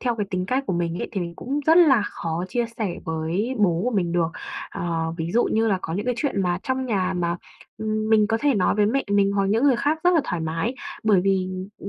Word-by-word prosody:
theo 245 Hz, -2 st, 0 dB
cái 205 Hz, -2 st, -2 dB
tính 185 Hz, 0 st, -2 dB
cách 260 Hz, +6 st, 0 dB
của -, -, -1 dB
mình 170 Hz, 0 st, -1 dB
ấy -, -, -4 dB
thì 200 Hz, -, -2 dB
mình 170 Hz, -1 st, -4 dB
cũng 280 Hz, +4 st, -3 dB
rất 320 Hz, +1 st, +6 dB
là 275 Hz, -10 st, +6 dB
khó 170 Hz, -3 st, -3 dB
chia 240 Hz, +5 st, 0 dB
sẻ 200 Hz, -6 st, -1 dB
với 165 Hz, +9 st, -2 dB
bố 175 Hz, -5 st, +2 dB
của 250 Hz, -, +1 dB
mình 185 Hz, -7 st, 0 dB
được. 170 Hz, -2 st, +2 dB, 0.4 s
Ờ, 165 Hz, -1 st, -2 dB
ví 165 Hz, 0 st, -3 dB
dụ 240 Hz, -, +3 dB
như 225 Hz, +1 st, +1 dB
là 195 Hz, -3 st, +1 dB
có 160 Hz, -, -4 dB
những 205 Hz, +5 st, -3 dB
cái 250 Hz, -, +1 dB
chuyện 265 Hz, -10 st, 0 dB
mà 175 Hz, -1 st, 0 dB
trong 260 Hz, 0 st, -2 dB
nhà 190 Hz, -5 st, 0 dB
mà, 170 Hz, -1 st, 0 dB, 0.4 s
ừm, 215 Hz, 0 st, -2 dB
mình 215 Hz, -1 st, +5 dB
có 225 Hz, +1 st, 0 dB
thể 290 Hz, -2 st, +3 dB
nói 190 Hz, -4 st, +2 dB
với 205 Hz, 0 st, +3 dB
mẹ 270 Hz, +6 st, 0 dB
mình, 200 Hz, -1 st, +3 dB
hoặc 200 Hz, -1 st, +1 dB
những 220 Hz, +6 st, +2 dB
người 275 Hz, -4 st, +5 dB
khác 300 Hz, +5 st, 0 dB
rất 355 Hz, -, +6 dB
là 325 Hz, -, +5 dB
thoải 175 Hz, -, -3 dB
mái 165 Hz, +9 st, -2 dB, 0.3 s
bởi 210 Hz, -4 st, +4 dB
vì, 190 Hz, -1 st, +1 dB, 0.3 s
ừm, 200 Hz, -, -7 dB
200 Hz, 265 wpm, -23 LUFS, 175-240 Hz, 0.4 s, rất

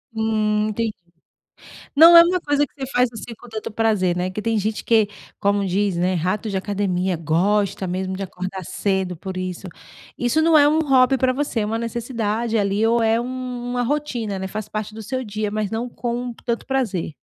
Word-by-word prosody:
Hum, 215 Hz, -1 st, +1 dB
entendi. 225 Hz, +1 st, -1 dB, 1.0 s
Não 330 Hz, +3 st, +9 dB
é 335 Hz, -, +11 dB
uma 360 Hz, +1 st, +1 dB
coisa 290 Hz, -1 st, +1 dB
que -, -, -26 dB
você 270 Hz, -2 st, -6 dB
faz, 250 Hz, 0 st, +3 dB
assim, 230 Hz, +1 st, -8 dB
com -, -, -14 dB
tanto 220 Hz, -1 st, -6 dB
prazer, 210 Hz, -5 st, +1 dB
né? 180 Hz, +1 st, -1 dB
Que 210 Hz, -, -4 dB
tem 225 Hz, 0 st, 0 dB
gente 210 Hz, +1 st, -2 dB
que, 220 Hz, -3 st, +3 dB, 0.3 s
como 200 Hz, 0 st, +1 dB
diz, 195 Hz, 0 st, 0 dB
né, 180 Hz, +2 st, +1 dB
rato 185 Hz, +6 st, -1 dB
de 195 Hz, -, -1 dB
academia, 190 Hz, -2 st, -1 dB
gosta 190 Hz, +5 st, +1 dB
mesmo 185 Hz, +1 st, -3 dB
de 195 Hz, -, -4 dB
acordar 185 Hz, 0 st, -6 dB
cedo 190 Hz, -1 st, -1 dB
por 185 Hz, +3 st, -7 dB
isso. 185 Hz, 0 st, -5 dB, 0.5 s
Isso 245 Hz, +6 st, +1 dB
não 320 Hz, 0 st, +5 dB
é 290 Hz, -1 st, +6 dB
um 310 Hz, +2 st, +3 dB
hobby 270 Hz, -3 st, +4 dB
pra 260 Hz, 0 st, +2 dB
você? 270 Hz, -2 st, -2 dB
É 210 Hz, -, 0 dB
uma 220 Hz, +2 st, -1 dB
necessidade 230 Hz, -1 st, -2 dB
ali, 205 Hz, +1 st, +1 dB
ou 230 Hz, 0 st, +2 dB
é 225 Hz, +1 st, +2 dB
um 255 Hz, 0 st, -5 dB, 0.2 s
uma 245 Hz, -, 0 dB
rotina, 245 Hz, -6 st, -2 dB
né, 190 Hz, 0 st, -4 dB
faz 210 Hz, +2 st, -5 dB
parte 215 Hz, 0 st, -4 dB
do 220 Hz, -, -8 dB
seu 255 Hz, +4 st, -3 dB
dia, 210 Hz, -1 st, -3 dB
mas 210 Hz, -1 st, -2 dB
não 230 Hz, +2 st, -3 dB
com 240 Hz, +1 st, -3 dB
tanto 235 Hz, -1 st, -1 dB
prazer. 220 Hz, -, -1 dB
215 Hz, 200 wpm, -22 LUFS, 195-245 Hz, 1.0 s, é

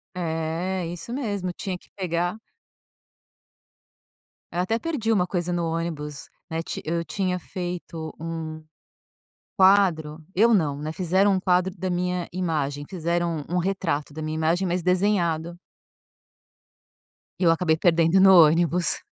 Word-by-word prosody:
É, 170 Hz, +2 st, -2 dB
isso 175 Hz, +7 st, -6 dB
mesmo. 205 Hz, -9 st, -2 dB
Tinha 185 Hz, 0 st, -4 dB
que -, -, -25 dB
pegar 175 Hz, 0 st, -1 dB, 2.1 s
Eu 175 Hz, -, -1 dB
até 225 Hz, +5 st, 0 dB
perdi 255 Hz, -7 st, -1 dB
uma 185 Hz, -5 st, +2 dB
coisa 180 Hz, -1 st, -2 dB
no 175 Hz, -1 st, 0 dB
ônibus. 160 Hz, -3 st, -4 dB, 0.2 s
Né, 160 Hz, 0 st, -2 dB
ti -, -, -5 dB
eu 170 Hz, +2 st, -1 dB
tinha 185 Hz, +1 st, -1 dB
feito 175 Hz, -2 st, -6 dB
um 160 Hz, -1 st, -5 dB, 0.9 s
quadro. 175 Hz, -6 st, +3 dB
Eu 230 Hz, +5 st, +5 dB
não, 150 Hz, -8 st, +1 dB
né. 155 Hz, +1 st, -4 dB
Fizeram 185 Hz, +4 st, +2 dB
um 190 Hz, -, +1 dB
quadro 180 Hz, 0 st, +2 dB
da 185 Hz, +1 st, -3 dB
minha 180 Hz, 0 st, -1 dB
imagem. 150 Hz, -5 st, -2 dB
Fizeram 170 Hz, -3 st, -1 dB
um 180 Hz, -, 0 dB
um -, -, +3 dB
retrato 170 Hz, -6 st, -1 dB
da 155 Hz, +2 st, -6 dB
minha 155 Hz, 0 st, -3 dB
imagem, 165 Hz, +4 st, +1 dB
mas 175 Hz, 0 st, -1 dB
desenhado. 175 Hz, -3 st, +1 dB, 1.8 s
E -, -, -1 dB
eu 170 Hz, -, +6 dB
acabei 165 Hz, -1 st, +2 dB
perdendo 165 Hz, +1 st, +3 dB
no 190 Hz, 0 st, +8 dB
ônibus. 170 Hz, +1 st, +2 dB
175 Hz, 140 wpm, -25 LUFS, 160-185 Hz, 2.1 s, no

